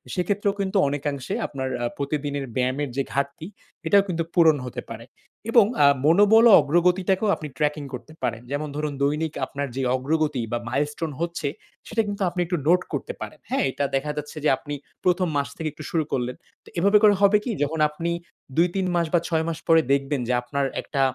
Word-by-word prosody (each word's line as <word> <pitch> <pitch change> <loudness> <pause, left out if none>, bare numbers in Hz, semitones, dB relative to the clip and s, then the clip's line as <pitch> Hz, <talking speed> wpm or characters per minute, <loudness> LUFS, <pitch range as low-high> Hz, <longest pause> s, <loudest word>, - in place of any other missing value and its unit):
সেক্ষেত্রেও 200 +2 0
কিন্তু 195 +1 0
অনেকাংশে 140 -2 -3
আপনার 130 -2 -4
আ - - +1
প্রতিদিনের 140 -1 -2
ব্যায়ামের 130 +3 0
যে 135 - +2
ঘাটতি 140 +4 -2 0.4
এটাও 200 -1 +5
কিন্তু 170 -2 -1
পূরণ 160 -4 +5
হতে 125 - -5
পারে। 115 - -8 0.5
এবং 230 -3 +7 0.2
আ - - +8 0.2
মনোবল 205 +8 +6
ও - - +7
অগ্রগতিটাকেও 180 +6 +2
আপনি 155 - -7
ট্র্যাকিং 150 0 0
করতে 140 +5 -8
পারেন। 115 -1 -1
যেমন 145 +2 -2
ধরুন 150 -1 -2
দৈনিক 150 +2 0
আপনার 140 +1 -4
যে 135 - -2
অগ্রগতি 150 0 0
বা 120 - 0
মাইলস্টোন 150 +4 -2
হচ্ছে 170 -3 -2 0.4
সেটা 225 0 +1
কিন্তু 200 0 -4
আপনি 175 +1 -6
একটু 175 0 -1
নোট 180 +2 +5
করতে - - -3
পারেন। - - -7
হ্যাঁ, 265 - +1
এটা 140 - -1
দেখা 150 +2 -1
যাচ্ছে 150 +1 -6
যে - - +5
আপনি 145 +2 -7 0.3
১ম 180 0 +2
মাস 140 - 0
থেকে 160 -1 -2
একটু 155 - -10
শুরু 165 -2 +1
করলেন। 125 0 -1 0.3
তো - - -14
এভাবে 200 +4 +5
করে 210 -1 +7
হবে 200 +1 +6
কি 245 - -2
যখন 155 +2 -2
আপনি 165 +3 -3 0.5
২-৩ 180 +2 +2
মাস 170 -1 +1
বা 175 - +5
৬ 160 -2 +1
মাস 165 -1 -2
পরে 165 -1 +6
দেখবেন 140 0 +1
যে 125 - +1
আপনার 140 +3 -2 0.2
একটা 140 - -2
155 Hz, 195 wpm, -24 LUFS, 140-180 Hz, 0.5 s, আ